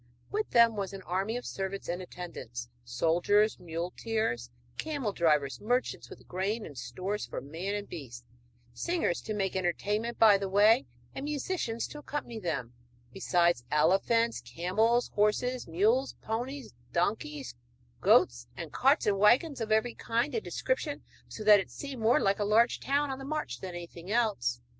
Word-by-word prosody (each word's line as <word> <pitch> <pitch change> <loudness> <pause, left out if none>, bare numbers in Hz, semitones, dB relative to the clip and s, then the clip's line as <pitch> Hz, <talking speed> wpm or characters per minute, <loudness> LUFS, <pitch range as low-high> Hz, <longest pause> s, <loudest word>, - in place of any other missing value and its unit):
With 425 +1 -1
them 235 -2 +5
was 200 -1 -3
an 195 -1 -8
army 195 +7 -1
of 245 - -7
servants 195 0 -4
and 175 +2 -2
attendants, 165 -10 -7 0.2
soldiers, 170 - +2
muleteers, 170 - -2 0.3
camel 285 -10 -2
drivers, 150 -6 +1
merchants 245 +4 -1
with - - -13
grain 200 +5 -2
and 145 - -10
stores 180 - -4
for - - -5
man 170 +8 -4
and 205 0 -4
beast, 125 -7 -8 0.5
singers 335 - -1
to 215 - -4
make 195 -2 -1
entertainment 205 +6 -1
by 210 -3 +7
the 195 -1 -3
way 205 - +5 0.3
and 270 - -5
musicians 290 -5 -2
to 295 - -8
accompany 275 -6 -5
them, 140 - -3 0.4
besides 175 -7 +2
elephants, 195 - +2
camels, 220 +8 +1
horses, 240 +5 +1
mules, 220 +11 +2
ponies, 245 +5 -4 0.2
donkeys, 150 - -1 0.5
goats, - - +4
and - - -7
carts - - +3
and 200 -1 +2
wagons 245 +7 +4
of 220 -1 -3
every 220 +2 +2
kind 235 +5 -1
and 450 - -1
description, - - -2 0.2
so 215 - -7
that 210 -1 +8
it 190 - -5
seemed 275 -4 -7
more 225 +2 +4
like 195 +1 +1
a - - +1
large 220 +4 +3
town 285 0 0
on 265 - -5
the - - -7
march 305 +2 -3
than 185 -2 -6
anything 175 +1 -9
else. 205 - +1
205 Hz, 160 wpm, -30 LUFS, 175-235 Hz, 0.5 s, that